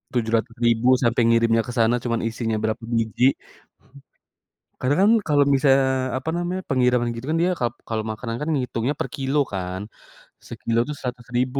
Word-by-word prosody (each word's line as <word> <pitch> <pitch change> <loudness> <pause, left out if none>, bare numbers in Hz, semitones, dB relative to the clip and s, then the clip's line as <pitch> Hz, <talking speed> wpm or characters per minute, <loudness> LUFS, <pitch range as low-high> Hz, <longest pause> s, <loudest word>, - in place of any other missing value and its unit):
Rp700.000 115 +1 +1 0.2
sampai 120 0 +2
ngirimnya 115 0 +3
ke - - -4
sana 115 0 +3
cuman 115 -2 -1
isinya 115 -1 -2
berapa 110 +1 -1 0.2
biji. 115 +4 +2 1.5
Karena 135 +3 +2
kan 210 - +5 0.2
kalau 145 -2 +4
bisa 140 0 +2
misalnya 130 -1 0
apa 140 +5 -4
namanya, 180 +2 -2
pengiriman 125 -2 +2
gitu 115 +2 -7
kan 160 - +1
dia 180 +1 +2
kap 120 -1 -1
kalau 110 -1 -2
makanan 115 +1 -5
kan 150 - -3
ngitungnya 125 0 -1
per - - -1
kilo 135 +1 -1 0.2
kan. 95 0 -4 0.7
Sekilo 115 0 -2
itu 150 - -3
Rp100.000, 125 +1 -2
120 Hz, 160 wpm, -23 LUFS, 115-135 Hz, 1.5 s, kan